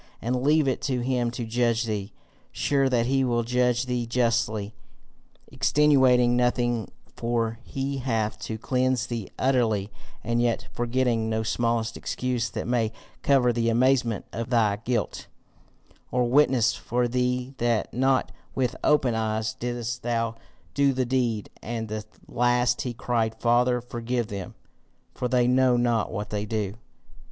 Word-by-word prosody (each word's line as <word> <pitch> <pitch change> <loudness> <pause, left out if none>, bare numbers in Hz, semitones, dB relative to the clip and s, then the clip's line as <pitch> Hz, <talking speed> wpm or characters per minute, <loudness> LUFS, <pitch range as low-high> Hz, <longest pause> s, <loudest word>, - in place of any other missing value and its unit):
And 125 +2 -1
leave 150 +1 +3
it 130 - 0
to 125 -2 0
him 125 -1 0
to 120 0 -5
judge 120 0 +1
thee 105 -3 -3 0.4
sure 135 -2 +1
that 120 -2 +2
he 135 +2 +2
will 120 -2 +1
judge 125 +1 +1
thee 125 -2 -2
justly, 115 -3 0 0.8
extenuating 130 -2 +4
nothing, 120 -2 +1 0.3
for 115 -1 -1
he 135 +1 -3
hath 115 -4 -1
to 110 - -5
cleanse 130 +1 0
thee 115 -4 -5
utterly, 110 -6 +1 0.3
and 115 +1 0
yet 120 -1 0
forgetting 120 -2 0
no 110 0 0
smallest 115 0 0
excuse 125 -3 -2
that - - -4
may 115 -3 +1 0.3
cover 130 -3 +3
the 115 0 +1
amazement 120 -2 +2
of 115 +1 -4
thy 110 -5 +2
guilt, 115 0 -2 0.8
or 125 -1 +1
witness 125 -2 +4
for 120 0 -1
thee 125 +1 -1
that 115 -3 0
not 130 +1 +2 0.2
with 125 -2 0
open 140 -5 +3
eyes 110 0 -1
didst 120 0 -4
thou 115 -1 -1 0.4
do 140 -1 +3
the 130 0 0
deed. 120 -4 -1
At 115 -1 -4
the 110 0 -4 0.2
last 120 0 +2
he 125 - -3
cried, 115 -1 -1
Father 125 +1 +3
forgive 120 -1 -3
them, 100 -3 -6 0.6
for 125 - -2
they 125 0 +2
know 125 0 +4
not 120 -2 +1
what 105 +1 -5
they 105 0 -2
do. 105 -3 -2
120 Hz, 145 wpm, -26 LUFS, 115-125 Hz, 0.8 s, extenuating